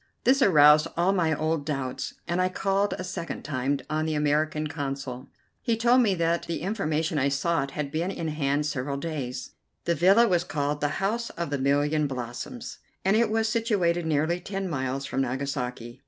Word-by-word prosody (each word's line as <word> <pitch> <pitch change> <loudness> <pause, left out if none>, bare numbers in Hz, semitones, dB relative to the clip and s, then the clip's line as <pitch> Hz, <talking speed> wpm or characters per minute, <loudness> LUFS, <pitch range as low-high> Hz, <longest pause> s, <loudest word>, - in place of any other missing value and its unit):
This 270 +2 +4
aroused 150 - +7
all 180 +3 +3
my 170 -4 +2
old 155 0 0
doubts, 135 -4 -3
and 175 +1 0
I 185 - +2
called 195 +2 0
a - - -4
second 180 -2 -5
time 140 0 -1
on 155 +1 -1
the 155 - -1
American 150 +1 +1
Consul. 135 -3 -5 0.3
He 230 -2 0
told 240 +2 +5
me 205 -5 +2
that 170 0 0
the 170 - -3
information 160 -5 -1
I 140 +1 +2
sought 140 +1 0
had 145 -2 -2
been 165 +4 -1
in 165 -4 -3
hand 150 -1 0
several 140 -1 -2
days. 135 -5 -4 0.3
The 170 - +2
villa 195 +8 +5
was 175 -4 +2
called 145 -2 -2
"The 145 -1 0
House 230 +3 -1
of 170 -4 -5
the 145 - -1
Million 145 +2 +2
Blossoms," 130 - -6 0.3
and 195 +2 +4
it 230 0 +3
was 220 0 +1
situated 200 -8 +1
nearly 160 +3 +1
ten 195 +1 -4
miles 135 -3 -2
from 135 - -1
Nagasaki. 125 -2 -3
155 Hz, 185 wpm, -26 LUFS, 140-185 Hz, 0.3 s, aroused